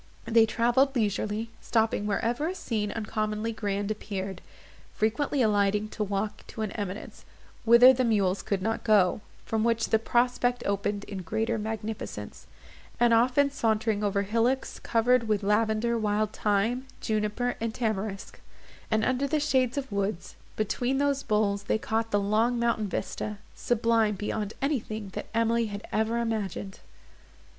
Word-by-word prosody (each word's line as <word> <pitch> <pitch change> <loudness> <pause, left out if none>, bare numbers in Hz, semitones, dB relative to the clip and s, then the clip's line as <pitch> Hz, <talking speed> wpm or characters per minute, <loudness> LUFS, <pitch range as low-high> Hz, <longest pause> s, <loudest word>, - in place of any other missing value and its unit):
They 225 -1 +5
travelled 245 +4 +2
leisurely; 215 0 -1
stopping 220 -2 +1
wherever 235 +8 0
a 365 - -3
scene 215 - -2
uncommonly 215 0 -2
grand 205 -1 -2
appeared; 195 -3 -5 0.5
frequently 250 +5 +1
alighting 205 0 +2
to 215 - -3
walk 205 +1 -3
to 220 - -5
an 210 - -3
eminence, 200 -1 -6 0.4
whither 235 +3 +8
the 255 0 +1
mules 200 -5 +1
could 195 -2 -2
not 225 +1 -1
go, 210 -2 +3 0.2
from 220 -1 0
which 230 -1 +1
the 220 - +3
prospect 245 +1 +1
opened 200 0 -1
in 200 -2 -6
greater 220 +6 -1
magnificence; 220 0 -5 0.5
and 240 -1 +4
often 255 +5 +4
sauntering 220 -4 0
over 200 -1 +1
hillocks 230 +6 0
covered 230 +1 +2
with 210 -2 +1
lavender, 220 +3 +1
wild 215 0 0
thyme, 225 +5 0
juniper, 215 +3 -1
and 230 -1 -2
tamarisc; 215 -4 -3 0.5
and 220 0 +2
under 260 +2 +1
the 305 +2 +1
shades 260 -3 +1
of 270 -4 -3
woods, 200 -2 -2 0.2
between 245 +5 0
those 280 0 +1
boles 200 -3 0
they - - +1
caught 225 +1 -1
the 205 - +2
long 220 +4 +1
mountain 235 -3 +1
vista, 210 +2 -4 0.2
sublime 230 -2 +1
beyond 210 +1 -3
anything 220 -7 -2
that - - -6
Emily 230 0 +2
had 205 0 -7
ever 220 +2 0
imagined. 210 -4 -3
220 Hz, 145 wpm, -28 LUFS, 205-235 Hz, 0.5 s, whither